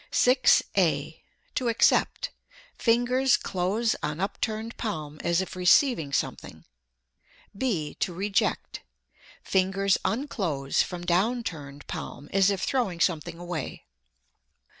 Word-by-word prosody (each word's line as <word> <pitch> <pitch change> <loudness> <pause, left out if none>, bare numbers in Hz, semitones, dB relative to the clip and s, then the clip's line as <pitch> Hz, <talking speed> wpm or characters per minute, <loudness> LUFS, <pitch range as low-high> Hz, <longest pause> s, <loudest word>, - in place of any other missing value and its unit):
6. 250 0 +4
(a) 160 -4 +1 0.3
To 250 - -1
accept: 235 - +2 0.4
fingers 245 +2 +3
close 200 +5 0
on 150 +1 -3
upturned 220 +3 -3
palm 155 -9 -4
as 170 +1 +2
if 190 - -6
receiving 180 - +3
something; - - -3 0.9
(b) 190 - -1
to - - 0
reject: 195 +3 -1 0.6
fingers 195 +1 +2
unclose 185 - -1
from 175 -1 -4
down 210 +8 +1
turned 145 -7 -7
palm 145 - -7
as 195 0 +4
if 195 -2 -1
throwing 230 -10 0
something 170 0 0
away. 175 -4 -5
190 Hz, 110 wpm, -27 LUFS, 165-230 Hz, 0.9 s, 6